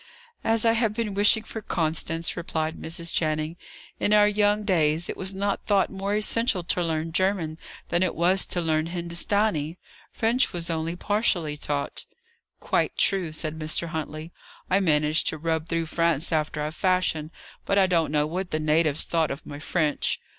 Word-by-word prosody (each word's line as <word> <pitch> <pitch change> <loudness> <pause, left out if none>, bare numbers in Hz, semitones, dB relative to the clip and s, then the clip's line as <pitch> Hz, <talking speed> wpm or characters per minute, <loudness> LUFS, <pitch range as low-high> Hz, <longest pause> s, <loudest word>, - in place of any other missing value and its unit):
'" 475 - -33
"As 225 0 +3
I 225 - +6
have 225 -2 +1
been 220 -3 -2
wishing 205 +2 +4
for 220 0 -7
Constance," 165 -2 -1
replied 160 -2 -2
Mrs. 170 +1 -4
Channing. 155 0 0 0.4
"In 205 - +2
our 210 0 +6
young 210 0 +2
days, 165 -4 +2
it - - -4
was 190 +1 -2
not 200 +1 -2
thought 200 -2 +2
more 195 +1 -2
essential 215 -2 +1
to 180 +1 0
learn 165 -1 -1
German 175 -3 0 0.3
than 175 - +1
it 185 -3 +1
was 180 +3 +3
to 175 - -2
learn 160 -1 +1
Hindustanee. 170 -1 -1 0.3
French 235 +3 +1
was 170 -1 -2
only 165 +1 -2
partially 180 -6 0
taught." 145 -1 -3 0.5
"Quite - - 0
true," 190 -5 +2
said 155 0 -4
Mr. 155 +2 -1
Huntley. 160 0 -5 0.4
"I 190 - +4
managed 155 -4 +2
to 160 - +1
rub 160 +1 -2
through 165 -1 0
France 165 -1 +1
after 155 -1 -1
a 155 - -3
fashion, 180 -3 0 0.3
but 200 - 0
I 195 - +6
don't 170 -5 +1
know 150 -1 +2
what 180 +4 -3
the 155 - -1
natives 155 -1 +2
thought 165 -2 0
of 140 - -6
my 145 - -8
French. 155 -1 0
170 Hz, 175 wpm, -25 LUFS, 155-195 Hz, 0.5 s, I